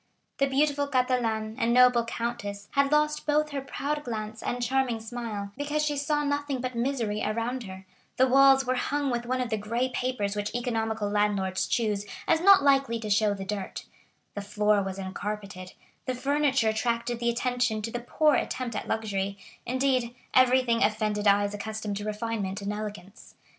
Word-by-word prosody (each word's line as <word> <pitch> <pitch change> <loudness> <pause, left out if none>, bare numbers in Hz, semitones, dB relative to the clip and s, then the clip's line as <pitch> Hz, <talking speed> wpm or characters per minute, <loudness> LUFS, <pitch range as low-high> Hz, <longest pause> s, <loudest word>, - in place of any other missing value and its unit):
The 275 - +3
beautiful 285 +1 +1
Catalane 240 -5 0
and 235 +1 +2
noble 250 -1 +6
countess 230 -4 -4
had 280 0 +2
lost 300 0 +1
both 300 0 +2
her 280 -1 -3
proud 295 +2 -3
glance 220 -3 -5
and 245 - -2
charming 255 -2 +1
smile, 220 -3 -5
because 295 +2 -1
she 295 -1 0
saw 295 +1 0
nothing 285 -2 -1
but 255 0 -3
misery 235 -4 -1
around 230 +3 -2
her; 190 0 -9 0.3
the 260 - +5
walls 270 +1 +6
were 255 - +1
hung 280 +2 -1
with 240 0 -2
one 255 +1 0
of 245 -2 -3
the 220 - +1
gray 235 +5 -1
papers 250 -6 -2
which 205 +2 -3
economical 225 -3 -1
landlords 205 -2 0
choose 210 -3 0 0.2
as 320 - +3
not 390 -4 +7
likely 275 -4 +3
to 215 -2 -4
show 205 0 +3
the 195 -1 -6
dirt; 195 -1 -5 0.5
the 205 - -4
floor 210 0 +2
was 195 -1 -4
uncarpeted; 195 -1 -6 0.3
the 255 - -1
furniture 275 -2 +2
attracted 235 +1 -1
the 235 0 +1
attention 245 -1 0
to 230 - -3
the 240 - -3
poor 300 +5 +2
attempt 250 -4 -2
at - - -4
luxury; 200 -3 -2 0.3
indeed, 255 -1 0 0.2
everything 255 -2 +4
offended 210 -1 0
eyes 205 0 +3
accustomed 215 0 -4
to 205 +1 -5
refinement 210 -2 -3
and 200 +1 -3
elegance. 210 -1 -8
235 Hz, 175 wpm, -27 LUFS, 210-260 Hz, 0.5 s, not